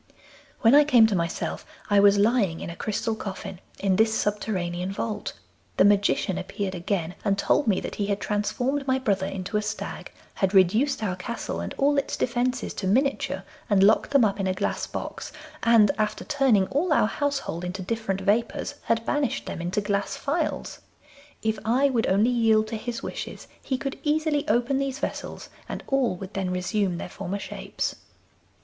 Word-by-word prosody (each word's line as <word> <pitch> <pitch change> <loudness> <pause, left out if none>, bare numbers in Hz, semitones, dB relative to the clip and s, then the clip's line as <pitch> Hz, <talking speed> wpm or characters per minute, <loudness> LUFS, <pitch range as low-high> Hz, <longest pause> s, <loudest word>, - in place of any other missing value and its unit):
'When 225 +2 +6
I 295 +1 +8
came 250 -6 +6
to 220 -2 +1
myself 170 -1 -2 0.2
I 205 -1 +4
was 200 0 +6
lying 205 -5 +2
in - - -5
a - - -8
crystal 220 +3 -2
coffin 195 -4 -6 0.2
in 190 -2 +1
this 220 +1 +4
subterranean 190 -4 -1
vault. 210 +1 -3 0.4
The - - +6
Magician 200 -2 +2
appeared 190 +1 -4
again, 175 -1 -2
and 195 -2 +1
told 265 +6 +2
me 200 -4 +3
that - - -5
he 205 - -1
had 200 0 0
transformed 250 +7 -1
my 260 0 +3
brother 200 -7 0
into 195 +2 -3
a - - +1
stag, 215 +1 -5 0.2
had 195 +1 0
reduced 220 +9 +3
our 185 -4 -1
castle 235 +6 -4
and - - -5
all 285 +1 +3
its 275 - -3
defences 250 +1 -1
to 190 - -3
miniature 270 +8 +1 0.3
and 200 -2 +4
locked 210 +2 +4
them 275 -5 +5
up 200 -1 -1
in 195 - 0
a 185 - 0
glass 200 - -2
box, - - -6 0.3
and 225 -4 +5
after 215 0 -1
turning 270 -10 +3
all 305 +6 0
our 300 - +4
household 275 - -2
into 185 +1 -4
different 195 -1 -2
vapours 225 +7 0
had 230 0 +1
banished 290 -1 0
them - - -5
into 180 +4 -1
glass 205 -1 -1
phials. 310 +3 -2 0.6
If 220 -1 0
I 260 +5 +3
would 235 -3 +1
only 210 +6 +3
yield 225 -2 +3
to 225 - -3
his 235 +2 -5
wishes - - -6
he 260 - -2
could 270 +2 -5
easily 300 -1 +1
open 245 +5 +2
these 275 -1 -2
vessels, - - -5 0.2
and - - -5
all 265 -8 +1
would 190 +2 -9
then 190 -1 -2
resume 180 0 -1
their - - -5
former 180 +2 -5
shapes. - - -4
215 Hz, 180 wpm, -26 LUFS, 195-250 Hz, 0.6 s, I